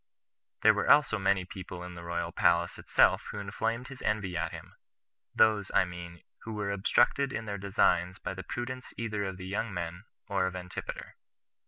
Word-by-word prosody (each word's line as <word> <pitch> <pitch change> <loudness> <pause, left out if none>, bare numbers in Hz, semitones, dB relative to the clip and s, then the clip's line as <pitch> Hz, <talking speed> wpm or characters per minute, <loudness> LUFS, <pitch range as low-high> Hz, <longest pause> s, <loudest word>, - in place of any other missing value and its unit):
There - - +8
were - - -1
also 145 -7 +5
many 95 -1 +2
people 90 -1 -8
in 90 0 -7
the 85 - -9
royal 85 0 -3
palace 85 0 +2
itself - - +3
who - - -6
inflamed 115 +5 -2
his 135 - -9
envy 100 -4 -1
at 85 +1 -1
him; - - -10 0.6
those, 105 -3 +4
I 100 - +5
mean, 85 -1 -9 0.2
who 110 - -7
were 105 -2 -2
obstructed 120 +7 +3
in 115 - -3
their 100 -2 -4
designs 90 -2 +2
by 90 - -4
the 95 - -6
prudence 130 +1 -5
either 105 -3 -2
of 95 -1 -4
the 95 - -7
young 100 +4 -2
men, 90 +2 -5 0.2
or 95 -2 +1
of 95 - -5
Antipater. 90 0 -6
95 Hz, 185 wpm, -30 LUFS, 90-110 Hz, 0.6 s, There